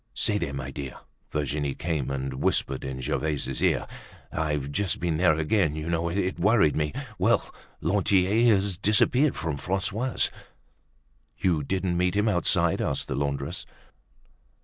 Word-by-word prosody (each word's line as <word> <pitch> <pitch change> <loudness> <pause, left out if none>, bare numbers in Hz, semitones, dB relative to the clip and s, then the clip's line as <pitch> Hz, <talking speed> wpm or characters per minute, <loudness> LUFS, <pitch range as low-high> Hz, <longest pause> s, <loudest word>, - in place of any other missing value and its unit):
"Say 105 -1 +2
there, 85 -6 -2
my 70 -2 -5
dear," 70 -2 -6 0.3
Virginie 75 -1 -1
came 80 -6 -2
and 65 -1 -3
whispered 65 -1 0
in 65 -1 -5
Gervaise's 65 0 -2
ear, - - +2 0.5
"I've 75 -3 -2
just 100 +4 0
been 85 -3 0
there 80 -2 +4
again, 80 -1 +1
you 80 +1 -4
know. 85 0 0
It 95 +1 -1
worried 100 -5 +4
me. 75 -1 0 0.3
Well! - - +2 0.3
Lantier 100 +4 +3
has 95 -2 -1
disappeared 125 +7 +3
from 80 -3 -3
Francois's." 105 - -1 1.1
"You 85 -5 +1
didn't 90 +3 -1
meet 90 +1 +1
him 105 +2 +2
outside?" 90 -5 +2
asked - - -1
the 70 - -1
laundress. 70 +4 -3
85 Hz, 145 wpm, -26 LUFS, 70-95 Hz, 1.1 s, there